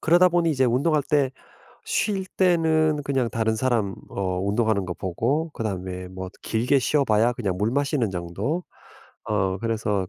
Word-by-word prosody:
그러다 175 +3 +5
보니 170 -1 +2
이제 130 -4 +2
운동할 140 +5 +2
때 140 -2 +1 0.6
쉴 195 -3 0
때는 160 -5 +2
그냥 135 -4 0
다른 110 -1 0
사람 110 -5 0 0.2
어 95 -2 -2
운동하는 100 -1 +1
거 90 - -4
보고 135 - -1
그다음에 95 -4 -4
뭐 95 0 -7
길게 125 +5 +1
쉬어 145 +2 +2
봐야 110 0 +3
그냥 100 -7 -2
물 105 +3 +1
마시는 140 -4 0
정도 95 - -3 0.6
어 95 0 0
그래서 105 -4 -1
115 Hz, 305 characters per minute, -24 LUFS, 100-150 Hz, 0.6 s, 그러다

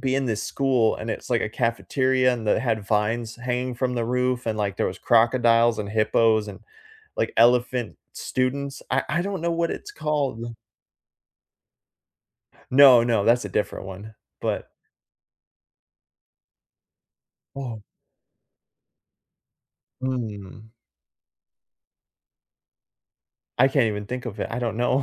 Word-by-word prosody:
be 130 -1 0
in 135 - 0
this 110 -2 -2
school, 130 -5 +1
and 110 - -5
it's, 120 - -6
like, 120 -2 +2
a - - -1
cafeteria 130 +3 +1
and 115 -3 -5
that - - +3
had 110 -5 -1
vines 110 +2 -1
hanging 125 +1 -3
from 125 0 -1
the 120 -1 -1
roof, 125 +1 -1
and, 110 -1 -1
like, 100 -2 -2
there - - 0
was 95 - -7
crocodiles 115 -1 +3
and 105 -1 -4
hippos 110 0 +2
and, 100 - -8 0.6
like, - - -1
elephant 120 0 +3 0.2
students. 135 +2 -2
I - - +2
I 160 +3 +1
don't 195 -3 -4
know 170 0 0
what 170 0 0
it's - - -7
called. 140 -7 -2 2.2
No, 130 -3 +8
no, 115 -4 +1
that's 120 +2 +3
a - - -4
different 105 -2 -3
one, 100 +3 -9 0.3
but - - -3 2.9
Oh. 120 -6 -6 2.2
Mm. 110 -4 -5 2.9
I 130 +2 +6
can't 135 -3 +2
even 105 -1 -3
think 125 +2 -5
of 110 -2 -7
it, - - -2
I 120 - -3
don't 115 -3 -2
know. 125 +3 +1
120 Hz, 125 wpm, -24 LUFS, 110-130 Hz, 2.9 s, No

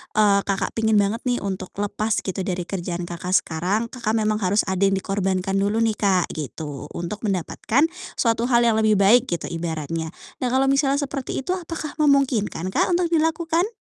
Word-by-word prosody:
eee, 205 -2 +5
Kakak 195 -1 -1
pengin 220 -1 +1
banget 205 +2 +2
nih 245 -3 0
untuk 190 -2 -5
lepas 205 +2 -1
gitu 190 0 -4
dari 185 -1 -2
kerjaan 175 -1 -4
Kakak 175 +2 -2
sekarang, 180 +7 +1
Kakak 230 -3 -2
memang 215 -1 +1
harus 200 +2 +2
ada 190 -1 -2
yang 195 - +2
dikorbankan 195 0 -1
dulu 205 +3 +1
nih, 220 -2 +1
Kak, 190 -4 +2
gitu 145 0 -6
untuk 175 +5 -4
mendapatkan 200 - 0 0.3
suatu 230 0 +1
hal 240 -1 +4
yang 225 -2 +3
lebih 215 -1 +4
baik 225 +6 +5
gitu 170 -2 -3
ibaratnya. 165 -1 -4 0.2
Nah 255 - 0
kalau 265 +2 +2
misalnya 275 0 +2
seperti 270 -1 -4
itu, - - -2
apakah 325 -3 -5
memungkinkan, 260 - +2
Kak, - - +2
untuk 345 -1 0
dilakukan? 330 +2 +1
205 Hz, 180 wpm, -23 LUFS, 185-245 Hz, 0.3 s, eee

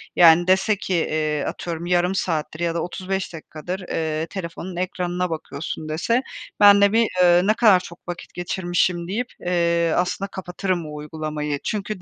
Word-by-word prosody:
yani, 170 0 +7
dese 190 +3 +3
ki, 190 -1 -4
eee, 155 -3 0
atıyorum: 170 -1 -4
yarım 180 +1 +2
saattir 155 -4 -2
ya 170 -1 -1
da 170 - 0
35 190 +2 -4
dakikadır, 165 +3 -6
eee, 160 0 -1
telefonun 175 0 -6
ekranına 180 0 -2
bakıyorsun, 155 0 -5
dese, 230 +11 +1 0.4
ben 205 -1 +8
de 200 0 +5
bir, 230 0 +4
eee, 175 0 +6
ne 215 - +4
kadar 215 -5 +5
çok 170 -1 -12
vakit 175 -1 -7
geçirmişim 175 -1 -1
deyip, 230 +7 -2
eee, 170 -1 +1
aslında 180 +2 0
kapatırım 185 -2 -3
o 150 - -8
uygulamayı. 150 -1 -4
Çünkü 210 -2 -3
175 Hz, 160 wpm, -22 LUFS, 160-190 Hz, 0.4 s, ben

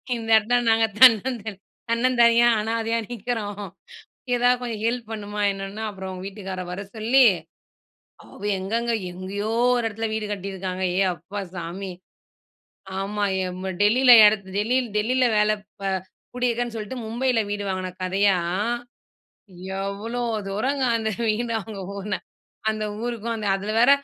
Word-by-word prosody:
இந்த 225 -1 -6
இடத்துல 235 +3 +2
நாங்க 225 0 +4 0.2
தன்னந்தனி 225 -4 +5 0.3
தன்னந்தனியா 235 0 +4
அனாதையா 225 +1 -1
நிக்குறோம். 220 -3 -4 0.7
எதாவது 245 +1 +3
கொஞ்சம் 230 -4 -4
ஹெல்ப் 235 -1 -1
பண்ணுமா 210 -1 -5
என்னன்னா 195 +2 -6
அப்புறம், 190 -2 -7
அவுங்க 185 0 -7
வீட்டுக்காரர 190 -2 -6
வர 185 +2 -5
சொல்லி, 235 +5 +4 1.0
அவ - - -15 0.2
எங்கங்க 230 +5 -1 0.2
எங்கயோ 195 +4 -4 0.3
ஒரு 240 - -1
இடத்துல 225 +1 -3
வீடு 220 -1 -2
கட்டியிருக்காங்க. 190 -2 -4
ஏய்! 190 0 +3
அப்பா 180 +6 -7 0.2
சாமி, 180 +3 -5 1.1
ஆமா 205 +1 -2 0.2
எம் 185 +1 -6 0.2
டெல்லியில 245 +5 +6
இடத் 210 -2 +3
டெல்லியில 245 +4 +1
டெல்லியில 250 +4 +2
வேல 210 0 +4 0.4
அ - - +1 0.5
கூடியிருக்கேன்னு 240 -1 -1
சொல்லிட்டு, 220 +3 -5
மும்பையில 240 +1 +1
வீடு 205 0 -3
வாங்குன 185 -1 -3
கதையா, 195 +1 +3 1.4
எவ்ளோ 210 +5 -3 0.3
தூரங்க 260 +8 -1
அந்த 220 -1 -1 0.2
வீடு, 230 +2 0
அவங்க 210 -1 -8 0.2
ஊரு. 200 0 -2 0.5
அந்த 215 0 -3 0.2
ஊருக்கும் 235 -1 -3
அந்த, 215 -1 -4
அதுல 200 +2 -4
வேற 245 +3 +6
215 Hz, 130 wpm, -24 LUFS, 195-235 Hz, 1.4 s, டெல்லியில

